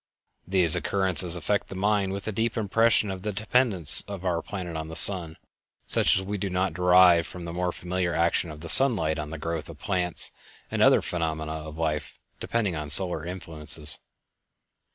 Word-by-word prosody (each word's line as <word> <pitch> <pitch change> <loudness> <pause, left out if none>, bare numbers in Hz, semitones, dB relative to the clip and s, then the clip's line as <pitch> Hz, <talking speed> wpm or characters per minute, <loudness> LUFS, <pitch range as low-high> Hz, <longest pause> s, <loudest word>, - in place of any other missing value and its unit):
These 90 -4 +4
occurrences 95 -3 +2
affect 100 +4 -2
the - - -9
mind 100 0 0
with 100 +1 -6
a - - -2
deep 110 +2 -2
impression 110 0 +1
of 95 -1 -7
the 105 +2 -4
dependence 105 - +2
of 100 -2 -8
our 85 -2 -1
planet 90 -4 -7
on 80 0 -5
the 80 - -9
sun, 85 -5 +4 0.5
such - - +2
as 95 - -3
we 100 +1 -5
do 100 - -3
not 90 -1 -2
derive 90 -1 +4
from 90 -1 -9
the 85 - -7
more 90 0 -2
familiar 90 -1 -3
action 85 0 0
of 75 0 -11
the 85 - -8
sunlight 90 - +4
on 75 0 -6
the 80 - -7
growth 80 -1 -5
of - - -11
plants 90 -3 +1 0.4
and - - -2
other - - +4
phenomena 80 -2 -3
of 80 0 -8
life 80 -2 -3 0.2
depending 105 -7 -2
on 75 -1 -6
solar 85 0 +2
influences. 80 -4 -1
90 Hz, 185 wpm, -25 LUFS, 80-95 Hz, 0.5 s, These